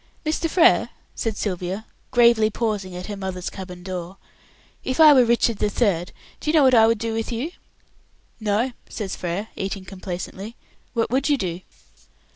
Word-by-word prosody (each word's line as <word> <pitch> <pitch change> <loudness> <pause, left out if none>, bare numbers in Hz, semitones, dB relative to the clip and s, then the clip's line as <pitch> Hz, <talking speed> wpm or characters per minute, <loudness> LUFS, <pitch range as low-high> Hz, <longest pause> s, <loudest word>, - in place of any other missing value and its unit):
"Mr. 315 +2 0
Frere," 345 +1 +4 0.2
said 220 -2 -3
Sylvia, 185 +2 -3 0.2
gravely 235 -3 +5
pausing 210 -4 -2
at 180 +1 -6
her 210 - -5
mother's 190 -2 -4
cabin 180 -2 -8
door, 185 0 -6 0.7
"if 260 - -2
I 310 -2 +9
were 260 -3 +6
Richard 235 -2 +2
the 210 - +1
Third, 195 -6 0 0.3
do - - -3
you 315 - +2
know 305 - +6
what 260 -1 +5
I 225 -2 +7
should 230 0 +3
do 225 +1 -3
with 225 +1 -2
you?" 245 +8 -3 0.9
"No," 220 +4 0 0.2
says 205 -4 -4
Frere, 185 +5 -3
eating 195 0 -4
complacently; 190 +3 -6 0.4
"what 230 -1 0
would 270 +3 +1
you 290 - +4
do?" 180 -5 -3
215 Hz, 170 wpm, -23 LUFS, 185-235 Hz, 0.9 s, I